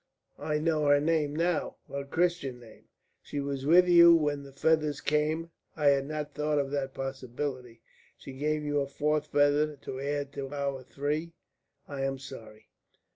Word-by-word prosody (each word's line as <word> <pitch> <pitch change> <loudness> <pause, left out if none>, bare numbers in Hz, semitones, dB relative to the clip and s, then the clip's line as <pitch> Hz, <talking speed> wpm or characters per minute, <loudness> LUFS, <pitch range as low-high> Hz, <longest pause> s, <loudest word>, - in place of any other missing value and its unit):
I 150 -1 -1
know 155 -1 +1
her 145 0 +5
name 150 -1 0
now 170 0 0
her 140 0 -4
Christian 160 -5 -1
name. 115 -2 -16 0.4
She 145 - -5
was 140 -1 -3
with 180 +3 +6
you 170 -1 +8
when 145 -3 0
the 140 -1 -12
feathers 150 0 +1
came. 155 +3 0 0.2
I 150 -2 +3
had 140 -1 +2
not 150 -1 -4
thought 150 +1 0
of 140 -1 0
that 135 -2 -3
possibility. 130 -2 -5 0.3
She 135 - -10
gave 150 +3 -1
you 145 0 0
a 140 - -1
fourth 150 +2 -1
feather 145 +1 +2
to 130 -1 -7
add 140 0 -3
to 135 -1 -5
our 140 -2 -3
three. 150 +5 -3 0.5
I 140 -2 -5
am 135 0 -1
sorry." 115 -5 -12
145 Hz, 170 wpm, -29 LUFS, 135-155 Hz, 0.5 s, you